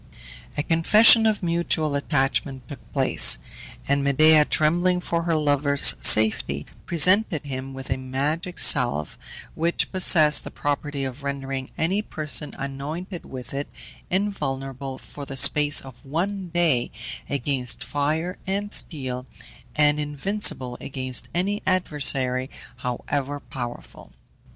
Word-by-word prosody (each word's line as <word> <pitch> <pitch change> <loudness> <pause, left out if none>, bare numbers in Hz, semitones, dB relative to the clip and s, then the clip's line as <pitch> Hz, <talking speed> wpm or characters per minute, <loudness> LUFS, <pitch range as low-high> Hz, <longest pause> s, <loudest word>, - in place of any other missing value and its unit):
A 145 - 0
confession 215 +8 +5
of 215 -3 -1
mutual 170 -3 0
attachment 135 -2 -1
took 145 -5 -12
place, - - +4 0.5
and 140 0 +1
Medea, 150 +2 +5
trembling 175 +5 +1
for 170 -1 -2
her 165 -1 -1
lover's 145 -2 +4
safety, 105 -10 +4 0.2
presented 180 -1 +2
him 135 -1 -6
with 135 -1 -8
a 130 - 0
magic 145 +7 -3
salve, 100 - +3 0.4
which 170 +2 -1
possessed 160 -5 +4
the - - -7
property 145 -1 -3
of 130 +2 -7
rendering 135 -1 -5
any 185 +6 0
person 155 -6 0
anointed 150 +7 -6
with 130 0 -9
it 140 +1 -4 0.4
invulnerable 135 -9 -3
for 145 - -11
the 135 -1 -7
space 145 +2 +4
of 130 -1 -14
one 180 +7 -3
day 165 -8 +1 0.4
against 135 -2 -1
fire 155 +5 -2
and 200 +2 -2
steel, 130 -4 -1 0.5
and 150 0 +2
invincible 145 -4 -2
against 130 -2 -4
any 200 +4 -1
adversary 135 -8 0 0.3
however 135 +3 -4
powerful. 120 -3 -9
145 Hz, 120 wpm, -23 LUFS, 135-170 Hz, 0.5 s, confession